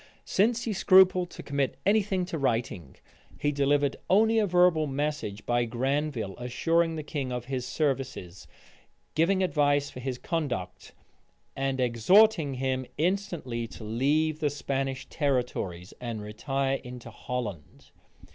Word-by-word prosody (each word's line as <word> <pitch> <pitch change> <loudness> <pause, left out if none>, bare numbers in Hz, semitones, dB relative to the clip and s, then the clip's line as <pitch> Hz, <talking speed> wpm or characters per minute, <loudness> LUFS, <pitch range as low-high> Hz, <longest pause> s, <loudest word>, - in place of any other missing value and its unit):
Still 220 +5 +2
he 230 -1 -2
scrupled 185 -1 +5
to - - -10
commit 140 -2 -1
any 210 +3 +4
thing 190 -2 -1
to 165 -3 -4
writing: 115 - -2 0.4
he 145 - +1
delivered 140 0 +1
only 220 +4 +4
a 210 - +2
verbal 175 -3 +4
message 140 -7 -3
by 120 0 +1
Granville 125 -3 -2
assuring 165 +7 +1
the 155 - -4
king 140 -3 -4
of 125 -1 -4
his 125 -1 -3
services, 135 - -3 0.7
giving 185 +4 +2
advice 145 -4 +2
for - - -9
his 125 0 -3
conduct, 140 - -4 0.6
and 135 -1 -1
exhorting 145 - +4
him 130 0 -2
instantly 165 - -1
to 115 - -11
leave 145 +8 +1
the 150 -2 +1
Spanish 135 -2 -3
territories, 125 - -2
and 115 -4 -4
retire 135 +6 -2
into 125 -2 -9
Holland. 110 - -6
140 Hz, 135 wpm, -28 LUFS, 125-165 Hz, 0.7 s, scrupled